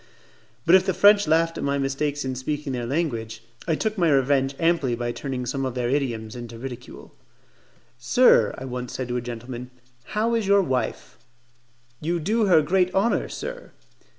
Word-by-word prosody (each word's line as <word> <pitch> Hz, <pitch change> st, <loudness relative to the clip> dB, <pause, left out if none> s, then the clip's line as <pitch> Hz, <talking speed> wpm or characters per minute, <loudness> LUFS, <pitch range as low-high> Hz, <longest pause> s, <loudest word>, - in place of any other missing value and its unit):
But 170 Hz, -, +4 dB
if 190 Hz, -, +6 dB
the 190 Hz, -, +1 dB
French 205 Hz, -1 st, +5 dB
laughed 165 Hz, +1 st, +2 dB
at -, -, -4 dB
my 140 Hz, 0 st, 0 dB
mistakes 140 Hz, +1 st, -2 dB
in 130 Hz, -, -2 dB
speaking 145 Hz, +2 st, -4 dB
their 120 Hz, -2 st, -3 dB
language, 115 Hz, -7 st, -3 dB, 0.2 s
I 165 Hz, -, +2 dB
took 215 Hz, +3 st, -2 dB
my 170 Hz, -2 st, +3 dB
revenge 135 Hz, -1 st, +2 dB
amply 165 Hz, -7 st, +1 dB
by 120 Hz, 0 st, -3 dB
turning 130 Hz, 0 st, -4 dB
some 135 Hz, +2 st, -2 dB
of 130 Hz, -2 st, -3 dB
their 125 Hz, -1 st, -1 dB
idioms 120 Hz, -6 st, -2 dB
into 120 Hz, -1 st, -8 dB
ridicule. 125 Hz, 0 st, -9 dB, 0.9 s
"Sir," 120 Hz, -, +4 dB
I 130 Hz, -, -7 dB
once 125 Hz, -1 st, -5 dB
said 130 Hz, -2 st, -4 dB
to 120 Hz, -, -1 dB
a -, -, -2 dB
gentleman, 120 Hz, +1 st, -7 dB, 0.5 s
"how 225 Hz, +2 st, +1 dB
is 225 Hz, -4 st, 0 dB
your 200 Hz, 0 st, +5 dB
wife?" 130 Hz, -6 st, -3 dB, 0.8 s
"You 170 Hz, +3 st, -1 dB
do 215 Hz, +7 st, +1 dB
her 170 Hz, -6 st, +5 dB
great 180 Hz, +3 st, +2 dB
honour, 205 Hz, +5 st, +1 dB
sir." -, -, -7 dB
140 Hz, 180 wpm, -24 LUFS, 125-170 Hz, 0.9 s, if